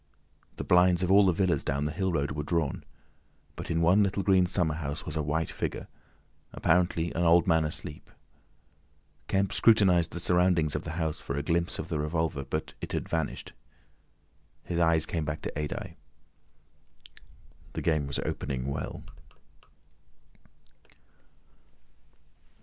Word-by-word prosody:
The - - -5
blinds 90 0 +4
of 90 - +1
all 100 0 +6
the - - +5
villas 90 +1 +1
down 70 +1 -1
the 75 - -1
hill 95 +2 -1
road 70 -4 -1
were 75 +1 -3
drawn, 80 -1 -1 0.7
but - - -7
in 85 -1 0
one 90 +5 +5
little 100 0 0
green 95 -2 +4
summer 90 -4 +1
house 75 -1 -5
was 75 - -6
a 80 - 0
white 75 +2 -1
figure, - - -4 0.7
apparently 85 -1 +1
an 85 - -1
old 85 0 +5
man 80 -2 +3
asleep. 75 - -6 1.2
Kemp 95 0 0
scrutinised 95 -7 +4
the 85 - -5
surroundings 85 -2 +2
of - - -3
the 80 - -4
house 80 -2 -2
for 70 - -4
a 70 - -2
glimpse 85 +3 0
of 80 - -6
the 80 - -1
revolver, 75 -2 -1
but - - -4
it - - -6
had - - -2
vanished. 80 -3 -3 1.1
His 85 - -3
eyes 80 -2 +3
came 80 -2 -2
back 75 0 -4
to - - -3
Adye. 75 0 -5 1.8
The - - -4
game 80 -4 +1
was 70 - -3
opening 65 -2 -3
well. 70 0 -5
80 Hz, 150 wpm, -28 LUFS, 75-90 Hz, 1.8 s, all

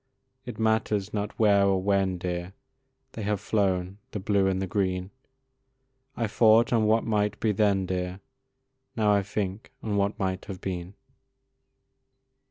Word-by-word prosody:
It 120 -3 -6
matters 110 -2 0
not 105 -1 -3
where 100 -3 +4
or 95 -1 +3
when, 95 -1 +1
dear, 90 +1 -4 0.6
They 115 - -7
have 105 -1 -1
flown, 95 -2 0
the 105 - -5
blue 100 0 +2
and 95 -1 0
the 95 - -1
green, 95 0 -1 1.1
I 115 - 0
thought 115 +2 +4
on 110 -2 +3
what 110 +1 +3
might 105 -2 0
be 110 - +1
then, 100 -2 +2
dear, 90 0 -3 0.8
Now 105 -2 +3
I 100 -1 +4
think 100 +2 -4
on 105 -2 -1
what 100 +1 0
might 95 -2 -2
have 95 -3 -7
been. 90 +1 -5
100 Hz, 150 wpm, -27 LUFS, 95-105 Hz, 1.1 s, where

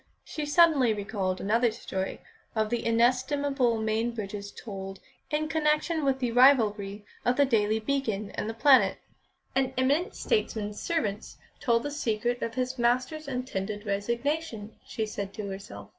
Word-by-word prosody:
She 300 -2 -5
suddenly 290 -8 +5
recalled 195 -2 -2
another 230 +4 +2
story 190 -4 -4 0.3
of 215 0 0
the 240 -1 0
inestimable 255 +2 +2
Mainbridge's, 215 -2 -2
told 195 -3 -7 0.3
in 305 +1 0
connection 310 +1 +1
with 270 -1 +2
the 250 -3 -1
rivalry 215 -6 +4 0.2
of 245 - +2
The 285 - +4
Daily 220 -3 +2
Beacon 220 -5 -2
and 215 - -3
The 225 - -5
Planet. 265 +3 +5 0.6
"An 265 -1 +1
eminent 285 +9 +1
statesman's 210 - -1
servant 220 -11 -2 0.2
told 235 -2 +2
the 290 - -3
secret 240 -3 -1
of 230 0 -3
his 255 0 -2
master's 255 +6 +1
intended 215 -5 -4
resignation," 230 +3 -2
she 220 - -3
said 200 -2 -5
to 210 -2 -4
herself. 195 +2 -8
235 Hz, 145 wpm, -28 LUFS, 210-275 Hz, 0.6 s, suddenly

